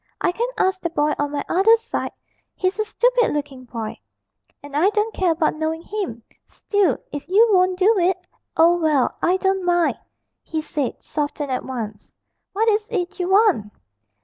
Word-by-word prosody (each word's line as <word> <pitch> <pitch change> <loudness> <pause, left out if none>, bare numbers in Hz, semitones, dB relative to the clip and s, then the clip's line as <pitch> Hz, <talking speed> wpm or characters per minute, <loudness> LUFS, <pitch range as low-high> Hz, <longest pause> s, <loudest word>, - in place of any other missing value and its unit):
I - - +1
can 465 +7 -1
ask 375 0 +1
the 340 - -1
boy 300 -2 +1
on 290 0 0
my 285 -1 -3
other 440 +6 +5
side 455 +1 -4 0.4
he's 375 +3 -1
a 430 - +1
stupid 485 -3 +2
looking 275 -3 -5
boy, 225 -3 -6 0.6
and 285 0 -9
I 340 +7 +4
don't 430 +1 -1
care 370 -2 +1
about 320 -1 +1
knowing 315 +1 -3
him 360 - -5 0.2
still, 405 -3 0
if 290 - -6
you 430 +5 +6
won't 370 -1 +3
do 395 +2 +4
it 360 +1 +2 0.2
' - - -28
'Oh, 340 +2 +5
well, 305 -6 +2
I 360 +2 +3
don't 385 0 0
mind,' 350 -1 +2 0.4
he 320 - -4
said, 295 -4 -3
softened 290 -1 -3
at 255 - -1
once. 220 -5 -6 0.4
'What 440 +3 0
is 425 0 +1
it 390 -3 -3
you 360 0 -1
want?' 385 - +3
355 Hz, 180 wpm, -22 LUFS, 295-400 Hz, 0.6 s, you